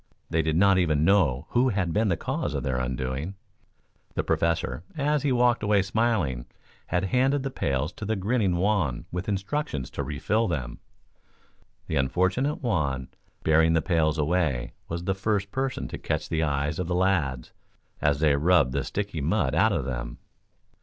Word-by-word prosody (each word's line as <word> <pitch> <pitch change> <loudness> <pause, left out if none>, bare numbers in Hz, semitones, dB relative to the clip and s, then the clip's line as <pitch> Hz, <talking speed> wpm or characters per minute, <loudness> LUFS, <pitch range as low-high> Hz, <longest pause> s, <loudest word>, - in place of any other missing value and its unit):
They 80 -1 +2
did 80 0 0
not 95 +2 +5
even 80 -4 +2
know 80 -10 +3
who 125 +2 +3
had 95 -6 -1
been 110 +1 +2
the 85 -4 +1
cause - - -2
of - - -2
their 65 -3 -1
undoing. 65 +7 -3 0.8
The - - 0
Professor, 85 -1 0 0.2
as 150 0 +1
he 145 - +1
walked 120 -1 +3
away 105 -2 +3
smiling, 95 - 0 0.4
had 90 +2 0
handed 135 +2 +3
the 135 - -3
pails 70 - -1
to 110 - -7
the 110 +2 0
grinning 100 -2 +1
Juan 90 - 0
with 90 +3 -3
instructions 95 - -2
to - - -4
refill 80 - 0
them. 65 -9 -3 1.1
The 80 - -2
unfortunate 95 - 0
Juan, 70 - -1 0.3
bearing 80 +1 +4
the 80 - +3
pails 80 -4 +1
away, 75 -5 0
was 85 +1 -4
the 95 - 0
first 100 0 -1
person 135 0 -2
to - - -6
catch - - -2
the 80 - 0
eyes 75 +1 -1
of 90 - -2
the 90 - -1
lads, 80 -10 0 0.5
as 70 -1 +2
they 75 -3 +4
rubbed 80 -3 +3
the 70 +1 -1
sticky 100 -6 -3
mud - - +1
out - - +4
of - - -1
them. - - -4
85 Hz, 175 wpm, -26 LUFS, 70-105 Hz, 1.1 s, not